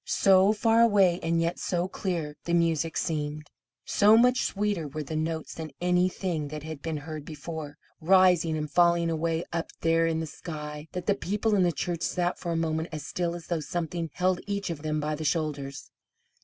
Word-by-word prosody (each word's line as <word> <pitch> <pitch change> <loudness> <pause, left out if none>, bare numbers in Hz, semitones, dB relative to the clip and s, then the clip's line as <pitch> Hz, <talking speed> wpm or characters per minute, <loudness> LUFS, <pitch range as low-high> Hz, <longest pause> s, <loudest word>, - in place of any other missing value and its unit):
So 195 +1 +4
far 225 +2 +3
away, 195 -6 +4
and 165 0 +1
yet 170 +1 -1
so 175 0 -1
clear 170 -6 -3
the 170 - +1
music 165 -1 +1
seemed 150 -1 -3 0.3
so 210 +2 +5
much 250 +2 +4
sweeter 205 -6 -1
were 155 +2 -5
the 155 +2 -5
notes 160 0 -2
than 160 -1 -6
anything 180 -2 0
that 150 0 -7
had 160 -2 -7
been 160 -2 -3
heard 155 0 -7
before, 155 -1 -7 0.2
rising 175 -2 +4
and 150 0 -2
falling 170 +1 +3
away 165 +1 -1
up 170 -1 -2
there 165 0 +3
in 160 -1 0
the 160 - -2
sky, 150 -1 -7
that 180 -1 -4
the 205 - +3
people 210 +3 -1
in 200 - +4
the 175 -1 +3
church 170 +1 -3
sat 175 0 -1
for 170 - -3
a - - 0
moment 160 0 -1
as 155 -2 -6
still 175 -1 -2
as 170 -2 -8
though 170 -2 -1
something 165 +1 -3
held 180 0 +1
each 200 -2 -2
of 155 -3 -6
them 155 0 -1
by 150 +1 -1
the 155 +1 -4
shoulders. 145 -3 -2
165 Hz, 195 wpm, -27 LUFS, 155-180 Hz, 0.3 s, so